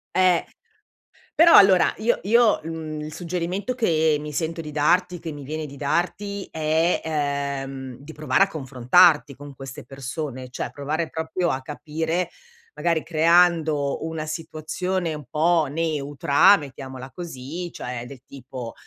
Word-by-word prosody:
Eh. 185 Hz, -2 st, +3 dB, 0.9 s
Però 335 Hz, +1 st, +7 dB
allora 195 Hz, -3 st, +6 dB
io 235 Hz, +2 st, +1 dB
io, 230 Hz, +2 st, +4 dB
uhm, 160 Hz, -1 st, -5 dB
il 155 Hz, 0 st, -7 dB
suggerimento 180 Hz, +6 st, -3 dB
che 160 Hz, -10 st, +2 dB
mi 150 Hz, 0 st, -7 dB
sento 165 Hz, +2 st, -2 dB
di 155 Hz, -2 st, -6 dB
darti 180 Hz, +4 st, +2 dB
che 165 Hz, -1 st, -6 dB
mi 145 Hz, -1 st, -8 dB
viene 155 Hz, +3 st, -4 dB
di 140 Hz, 0 st, -11 dB
darti 190 Hz, +7 st, -2 dB
è, 160 Hz, +2 st, +1 dB, 0.6 s
ehm, 135 Hz, -1 st, -7 dB
di 145 Hz, +3 st, -11 dB
provare 155 Hz, +5 st, +2 dB
a -, -, +2 dB
confrontarti 140 Hz, 0 st, +3 dB
con 145 Hz, -1 st, -11 dB
queste 135 Hz, -1 st, -9 dB
persone, 135 Hz, -1 st, -6 dB
cioè 125 Hz, -, -4 dB
provare 155 Hz, +4 st, -3 dB
proprio 160 Hz, +2 st, -2 dB
a 130 Hz, -, -2 dB
capire, 160 Hz, +5 st, -3 dB, 0.4 s
magari 165 Hz, -2 st, 0 dB
creando 160 Hz, -3 st, +2 dB
una 160 Hz, -1 st, -4 dB
situazione 165 Hz, +3 st, -3 dB
un 150 Hz, -2 st, -8 dB
po' 160 Hz, +2 st, +2 dB
neutra, 145 Hz, +2 st, +3 dB
mettiamola 130 Hz, -3 st, -8 dB
così, 165 Hz, +2 st, -7 dB
cioè 125 Hz, -1 st, -6 dB
del 130 Hz, 0 st, -11 dB
tipo, 125 Hz, -3 st, -8 dB
155 Hz, 140 wpm, -23 LUFS, 140-175 Hz, 0.9 s, Però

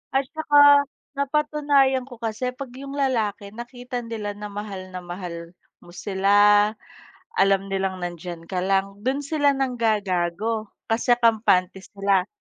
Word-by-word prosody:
At 270 Hz, -, +4 dB
saka 290 Hz, -2 st, +6 dB, 0.3 s
napatunayan 280 Hz, -2 st, +2 dB
ko 250 Hz, -, -10 dB
kasi 230 Hz, +2 st, -3 dB
'pag 265 Hz, -1 st, -7 dB
'yung 275 Hz, +2 st, -8 dB
lalaki 220 Hz, -7 st, -1 dB
nakita 245 Hz, +2 st, -6 dB
nila 225 Hz, -3 st, -5 dB
na 205 Hz, +1 st, -7 dB
mahal 200 Hz, -2 st, -7 dB
na 180 Hz, -, -6 dB
mahal 175 Hz, -1 st, -7 dB, 0.3 s
mo 175 Hz, -, -15 dB
sila, 205 Hz, +2 st, +4 dB, 0.7 s
alam 195 Hz, 0 st, +3 dB
nilang 190 Hz, -1 st, -2 dB
nandiyan 175 Hz, -1 st, -6 dB
ka 185 Hz, -, -2 dB
lang, 195 Hz, +2 st, 0 dB
do'n 265 Hz, +6 st, -1 dB
sila 285 Hz, -1 st, +2 dB
nanggagago 220 Hz, -5 st, -1 dB, 0.2 s
kasi 235 Hz, +2 st, +3 dB
kampante 205 Hz, -5 st, +3 dB
sila. 195 Hz, -2 st, +1 dB
215 Hz, 130 wpm, -24 LUFS, 195-260 Hz, 0.7 s, saka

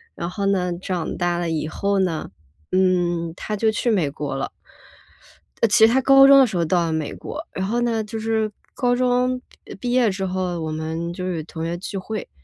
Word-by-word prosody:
然 170 Hz, -, -4 dB
后 200 Hz, +2 st, -3 dB
呢， 180 Hz, -3 st, +1 dB
长 180 Hz, -4 st, -3 dB
大 175 Hz, -1 st, 0 dB
了 175 Hz, -1 st, -2 dB
以 155 Hz, -1 st, -1 dB
后 200 Hz, +5 st, 0 dB
呢， 175 Hz, -5 st, -1 dB, 0.4 s
嗯， 175 Hz, -3 st, +1 dB
他 215 Hz, -, -5 dB
就 220 Hz, +2 st, +2 dB
去 235 Hz, +2 st, 0 dB
美 180 Hz, -9 st, +1 dB
国 145 Hz, 0 st, -5 dB
了。 135 Hz, -, -3 dB, 1.1 s
呃， 230 Hz, -, +5 dB
其 220 Hz, +1 st, +6 dB
实 225 Hz, -, +2 dB
他 265 Hz, -, +4 dB
高 270 Hz, +1 st, +8 dB
中 275 Hz, 0 st, +8 dB
的 265 Hz, -, +7 dB
时 200 Hz, -, -4 dB
候 170 Hz, -, +2 dB
到 170 Hz, +1 st, +2 dB
了 165 Hz, -, -1 dB
美 160 Hz, -2 st, -2 dB
国， -, -, -7 dB
然 190 Hz, -, -2 dB
后 235 Hz, +4 st, 0 dB
呢 230 Hz, -2 st, 0 dB
就 220 Hz, +1 st, -6 dB
是， 220 Hz, 0 st, 0 dB
呃， 215 Hz, -, -3 dB, 0.2 s
高 245 Hz, -1 st, +1 dB
中 250 Hz, 0 st, +1 dB, 0.4 s
毕 245 Hz, -, -2 dB
业 245 Hz, -3 st, +3 dB
之 190 Hz, 0 st, -3 dB
后 185 Hz, -2 st, -2 dB
我 160 Hz, -1 st, -3 dB
们 160 Hz, +2 st, -3 dB
就 180 Hz, -, -5 dB
是 170 Hz, -3 st, -2 dB
同 160 Hz, 0 st, -6 dB
学 170 Hz, +1 st, -2 dB
聚 195 Hz, +2 st, -6 dB
会。 210 Hz, +3 st, -5 dB
185 Hz, 235 characters per minute, -22 LUFS, 170-225 Hz, 1.1 s, 高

